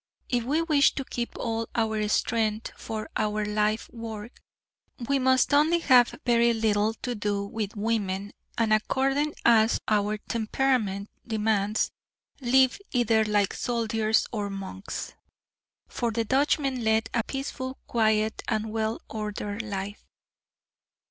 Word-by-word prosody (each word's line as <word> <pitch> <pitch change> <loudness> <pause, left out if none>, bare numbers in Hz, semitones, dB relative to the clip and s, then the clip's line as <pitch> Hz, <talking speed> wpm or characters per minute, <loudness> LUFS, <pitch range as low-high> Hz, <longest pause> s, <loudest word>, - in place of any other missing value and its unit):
If 240 -2 0
we 305 +6 +1
wish 300 -4 +4
to 270 - -3
keep 240 -1 -4
all 225 -1 -2
our 220 -2 0
strength 220 0 0
for 215 -1 -5
our 210 0 0
life 210 +1 0
work, 225 0 -8 0.7
we 280 0 +2
must 260 +1 +3
only 305 +4 +5
have 255 -7 +4
very 235 -1 +4
little 220 0 +1
to 250 - -1
do 205 -2 -1
with 210 +1 -4
women 205 -2 -1 0.3
and 225 -2 +2
according 270 +7 +1
as 225 -1 +5
our 210 0 +1
temperament 215 -2 -1 0.2
demands, 215 -1 +1 0.5
live 260 +2 +3
either 230 -3 +3
like 205 -2 +1
soldiers 225 -2 +1
or 205 -3 -2
monks. 195 0 -6 0.7
For 235 - -2
the 230 0 -1
Dutchmen 270 0 +1
led 220 0 +2
a 230 - +1
peaceful, 270 0 -5
quiet 220 -1 +1
and 220 -1 -1
well 220 0 -1
ordered 210 0 -4
life. 205 -1 -5
220 Hz, 130 wpm, -27 LUFS, 210-245 Hz, 0.7 s, only